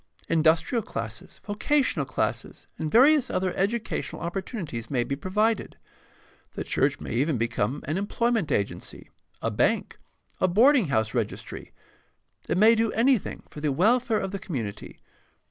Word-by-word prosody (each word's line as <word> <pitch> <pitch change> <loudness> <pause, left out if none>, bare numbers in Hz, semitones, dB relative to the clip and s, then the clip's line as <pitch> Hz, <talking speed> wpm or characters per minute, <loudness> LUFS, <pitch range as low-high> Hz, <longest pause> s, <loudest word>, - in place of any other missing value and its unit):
Industrial 165 +8 +3
classes, 115 - -7
vocational 260 +7 0
classes, - - -3
and 155 -1 -2
various 275 +3 +5
other 185 -1 -1
educa 215 +4 -1
tional - - -7
opportunities 170 - -5
may 125 -4 +1
be 140 - -3
provided. 210 +9 -1 0.8
The - - -3
church - - 0
may - - -7
even 140 +4 +1
become 115 +3 -1
an 155 +5 -1
employment 220 -4 0
agency, 100 -5 -3 0.3
a - - 0
bank, - - 0 0.4
a 185 - +3
boarding 235 - +5
house 110 -5 0
registry 115 -5 -4 0.4
— - - -34
it - - +1
may 215 +4 +7
do 225 -1 +1
anything 240 -1 +1
for 150 - -9
the 150 -1 +1
welfare 220 - +2
of 195 -1 -3
the 195 - -4
community. 115 - -6
185 Hz, 145 wpm, -26 LUFS, 140-225 Hz, 0.8 s, may